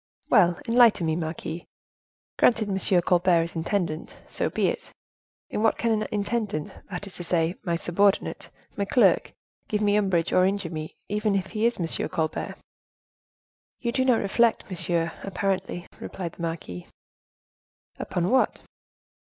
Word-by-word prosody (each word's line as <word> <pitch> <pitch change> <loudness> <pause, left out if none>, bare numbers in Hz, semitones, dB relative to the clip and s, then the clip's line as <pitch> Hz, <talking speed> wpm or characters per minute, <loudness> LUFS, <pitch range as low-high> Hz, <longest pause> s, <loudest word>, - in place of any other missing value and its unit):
"Well, 180 -6 +5
enlighten 230 -6 +5
me, 160 -1 +1
marquise; 160 0 -4 0.8
granted 225 -3 +4
Monsieur 190 -2 +2
Colbert 175 -1 +3
is 170 - -7
intendant—so 165 -1 -2
be - - +1
it. - - -5 0.6
In - - -1
what 225 - +3
can 230 - +1
an 215 -1 0
intendant, 205 -6 -2 0.2
that 185 0 -5
is 195 - -9
to 175 - -5
say 170 -1 +1
my 170 -4 -1
subordinate, 195 +4 +1 0.3
my 200 - -1
clerk, 240 +5 +3 0.4
give 210 - 0
me 205 -1 +2
umbrage 190 -5 +1
or 185 - +5
injure 190 -2 0
me, 155 -1 -6
even 210 0 0
if 190 -1 -2
he 220 +1 +2
is 240 - -1
Monsieur 165 -2 -1
Colbert?" 160 -1 -2 1.2
"You 235 - -1
do 260 - +1
not 250 -4 +3
reflect, 225 +1 +2
monsieur, 170 -2 +1
apparently," 190 -2 -2
replied 175 -3 -5
the - - -11
marquise. 160 - -5 1.1
"Upon 180 0 -1
what?" 260 0 +2
190 Hz, 145 wpm, -26 LUFS, 170-210 Hz, 1.2 s, Well